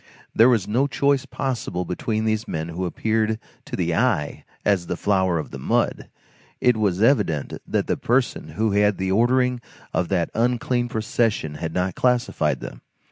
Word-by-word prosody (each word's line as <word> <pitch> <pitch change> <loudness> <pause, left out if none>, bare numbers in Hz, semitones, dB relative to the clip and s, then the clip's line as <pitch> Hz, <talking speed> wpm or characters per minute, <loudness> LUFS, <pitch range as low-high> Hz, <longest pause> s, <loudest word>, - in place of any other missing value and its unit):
There 115 +3 +6
was 115 -7 +2
no 125 +6 +2
choice 140 -1 +1
possible 115 -9 -3
between 110 +5 -2
these 110 0 0
men 80 +1 -3
who 90 +2 -3
appeared 110 +4 0 0.3
to - - -5
the - - 0
eye 75 0 0 0.2
as 95 -4 +2
the 90 - -2
flower 95 -4 +1
of 75 - -5
the 70 - -7
mud. - - 0 0.5
It 125 -1 +4
was 100 -2 +1
evident 80 - +2
that - - 0
the - - -1
person 120 - 0
who 110 -1 +2
had 100 +1 +3
had 105 -1 +3
the 95 0 -1
ordering 125 +3 +2 0.3
of 85 - 0
that 85 -3 0
unclean 120 +1 0
procession 110 -7 0
had 80 +2 -5
not 90 0 0
classified 125 +2 +1
them. - - -8
110 Hz, 175 wpm, -23 LUFS, 90-120 Hz, 0.5 s, There